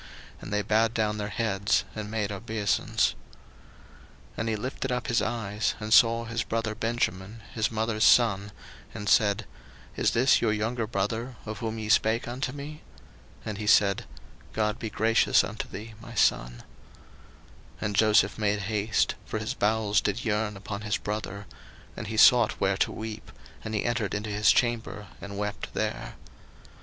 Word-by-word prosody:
And -, -, -8 dB
they 105 Hz, 0 st, 0 dB
bowed 110 Hz, +3 st, +2 dB
down 105 Hz, -1 st, 0 dB
their 105 Hz, 0 st, -3 dB
heads, 105 Hz, -3 st, +1 dB
and 110 Hz, -1 st, -5 dB
made 105 Hz, -2 st, -2 dB
obeisance. 100 Hz, 0 st, 0 dB, 1.2 s
01:043:029 -, -, -25 dB
And 110 Hz, 0 st, -1 dB
he 110 Hz, -, 0 dB
lifted 130 Hz, +4 st, -4 dB
up 125 Hz, -, -1 dB
his 115 Hz, 0 st, +1 dB
eyes, 105 Hz, -2 st, -1 dB
and 110 Hz, 0 st, -1 dB
saw 115 Hz, 0 st, +5 dB
his 115 Hz, 0 st, -2 dB
brother 115 Hz, 0 st, -2 dB
Benjamin, 110 Hz, -2 st, -2 dB
his 110 Hz, -2 st, 0 dB
mother's 110 Hz, 0 st, -1 dB
son, 105 Hz, -4 st, +4 dB, 0.4 s
and 105 Hz, -, -6 dB
said, 105 Hz, +1 st, +3 dB, 0.5 s
Is -, -, +2 dB
this 130 Hz, +3 st, +3 dB
your 110 Hz, -2 st, +2 dB
younger 110 Hz, +2 st, -1 dB
brother, 115 Hz, +4 st, -2 dB
of 110 Hz, -1 st, -6 dB
whom 115 Hz, -2 st, -3 dB
ye 110 Hz, -1 st, -4 dB
spake 110 Hz, +1 st, +2 dB
unto 125 Hz, +2 st, -3 dB
me? 145 Hz, +2 st, -8 dB, 0.6 s
And 105 Hz, -1 st, -4 dB
he 105 Hz, -, -4 dB
said, 100 Hz, -2 st, +4 dB, 0.5 s
God 105 Hz, -1 st, 0 dB
be 115 Hz, -, -4 dB
gracious 115 Hz, +1 st, +3 dB
unto -, -, -5 dB
thee, 110 Hz, +3 st, -8 dB
my -, -, -10 dB
son. -, -, +1 dB, 1.1 s
01:043:030 -, -, -21 dB
And 105 Hz, -1 st, -2 dB
Joseph 105 Hz, -1 st, +4 dB
made 105 Hz, -1 st, +1 dB
haste; 105 Hz, -1 st, 0 dB
for -, -, -3 dB
his -, -, -3 dB
bowels 105 Hz, -1 st, +1 dB
did 105 Hz, +5 st, -2 dB
yearn 105 Hz, -1 st, -1 dB
upon 100 Hz, +1 st, -6 dB
his 105 Hz, -1 st, -1 dB
brother: 105 Hz, -1 st, -5 dB, 0.5 s
and -, -, -6 dB
he 110 Hz, +1 st, -4 dB
sought 120 Hz, -1 st, +6 dB
where 95 Hz, 0 st, +1 dB
to -, -, +1 dB
weep; 110 Hz, -1 st, -7 dB, 0.3 s
and 110 Hz, 0 st, -4 dB
he 105 Hz, -, -1 dB
entered 120 Hz, -4 st, -1 dB
into 105 Hz, 0 st, -3 dB
his 105 Hz, +1 st, +4 dB
chamber, 110 Hz, -5 st, -1 dB
and 100 Hz, 0 st, -7 dB
wept 105 Hz, -1 st, -4 dB
there. -, -, -3 dB
110 Hz, 170 wpm, -27 LUFS, 105-115 Hz, 1.2 s, sought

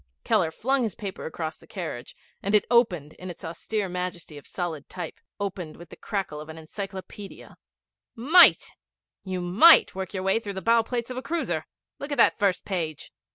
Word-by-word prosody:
Keller 205 Hz, -8 st, +2 dB
flung 265 Hz, +11 st, 0 dB
his 220 Hz, -5 st, -2 dB
paper 200 Hz, -3 st, -6 dB
across 160 Hz, 0 st, -5 dB
the -, -, -19 dB
carriage, 160 Hz, -10 st, -6 dB, 0.3 s
and 200 Hz, +2 st, +1 dB
it 210 Hz, -, +4 dB
opened 180 Hz, -, +3 dB
in 185 Hz, -, -7 dB
its 170 Hz, -, -9 dB
austere 195 Hz, +5 st, -3 dB
majesty 180 Hz, -3 st, -5 dB
of 145 Hz, -, -11 dB
solid 165 Hz, -5 st, -4 dB
type 180 Hz, -, -7 dB, 0.2 s
opened 185 Hz, -5 st, -4 dB
with 170 Hz, -1 st, -12 dB
the -, -, -11 dB
crackle 195 Hz, -8 st, -4 dB
of 155 Hz, -, -11 dB
an 160 Hz, -, -8 dB
encyclopædia. 195 Hz, +4 st, -8 dB, 0.6 s
'Might! 305 Hz, +10 st, +6 dB, 0.5 s
You 185 Hz, -2 st, -3 dB
might 205 Hz, -, +7 dB
work 190 Hz, 0 st, -5 dB
your 185 Hz, -, -2 dB
way 195 Hz, +3 st, +2 dB
through 205 Hz, -3 st, -6 dB
the -, -, -2 dB
bow 230 Hz, 0 st, +5 dB
plates 240 Hz, +1 st, -3 dB
of 250 Hz, -, -6 dB
a -, -, -2 dB
cruiser. 335 Hz, +4 st, -2 dB, 0.3 s
Look 280 Hz, +1 st, -6 dB
at 285 Hz, -, -1 dB
that -, -, +4 dB
first 195 Hz, -4 st, +1 dB
page!' 165 Hz, -6 st, -4 dB
190 Hz, 190 wpm, -26 LUFS, 170-225 Hz, 0.6 s, might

